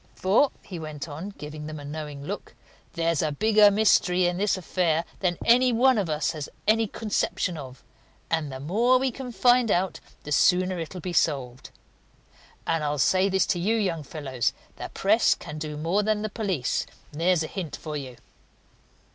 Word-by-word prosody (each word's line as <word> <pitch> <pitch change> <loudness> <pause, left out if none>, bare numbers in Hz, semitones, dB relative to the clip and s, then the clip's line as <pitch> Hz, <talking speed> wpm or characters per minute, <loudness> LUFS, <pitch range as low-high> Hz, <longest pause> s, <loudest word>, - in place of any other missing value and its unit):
For," 210 +9 +3
he 180 -4 -7
went 155 -1 -6
on, 160 +6 -6
giving 150 +1 -7
them 155 -1 -6
a 145 - -9
knowing 145 -1 -6
look, - - -6 0.4
"there's 165 -2 0
a 155 - 0
bigger 210 +5 +5
mystery 195 -3 +3
in 175 0 0
this 205 0 +1
affair 170 -2 0
than 175 -3 0
any 250 +2 +5
one 250 0 +4
of 190 -5 -2
us 150 0 0
has 155 -4 -6 0.2
any 220 +1 +3
conception 200 -4 -2
of, 130 -4 -9 0.4
and 160 -3 -1
the 130 - -6
more 225 - +3
we 260 0 0
can 250 +1 -7
find 245 0 +4
out 185 -1 0 0.2
the 150 - -8
sooner 180 +4 +3
it'll 170 +2 -6
be 180 +2 -4
solved. 130 -7 0 1.0
And 165 -2 0
I'll 150 0 -1
say 185 +7 +3
this 190 0 +2
to 175 - -4
you 210 +6 +1
young 185 -7 -1
fellows: 135 -5 -2 0.2
the - - -6
press - - +3
can 150 +1 -8
do 150 -1 -5
more 170 +7 +1
than 210 0 0
the 215 - -2
police. 195 - -2 0.2
There's 165 +2 +1
a - - -4
hint 175 -5 -5
for 155 -2 -7
you!" 130 -4 -6
175 Hz, 180 wpm, -26 LUFS, 150-205 Hz, 1.0 s, bigger